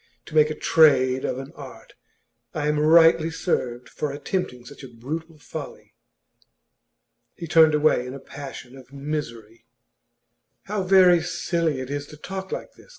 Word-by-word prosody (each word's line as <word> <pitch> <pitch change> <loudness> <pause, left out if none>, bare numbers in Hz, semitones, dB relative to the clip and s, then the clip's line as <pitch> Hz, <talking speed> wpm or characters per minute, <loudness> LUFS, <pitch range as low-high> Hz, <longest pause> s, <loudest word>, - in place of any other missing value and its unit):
To - - -13
make 155 -1 +5
a 155 - -4
trade 130 -5 +4
of - - -2
an 135 0 -8
art! - - -12 0.6
I 150 -1 -1
am 150 0 +1
rightly 165 +1 +5
served 125 -7 -2
for 150 - -4
attempting 140 -3 -4
such 140 - -12
a - - -8
brutal 155 +7 -7
folly.' 145 - -9 1.4
He 170 - -7
turned 160 -1 +5
away 150 -4 +2
in 130 - -7
a - - -8
passion 135 -2 -10
of 130 -1 -15
misery. 120 -6 -6 1.0
'How 205 0 -3
very 185 -2 +5
silly 170 -3 -1
it 130 +1 -7
is 145 0 -4
to 150 - -13
talk 190 +4 -7
like - - -6
this! - - -20
150 Hz, 155 wpm, -24 LUFS, 130-165 Hz, 1.4 s, make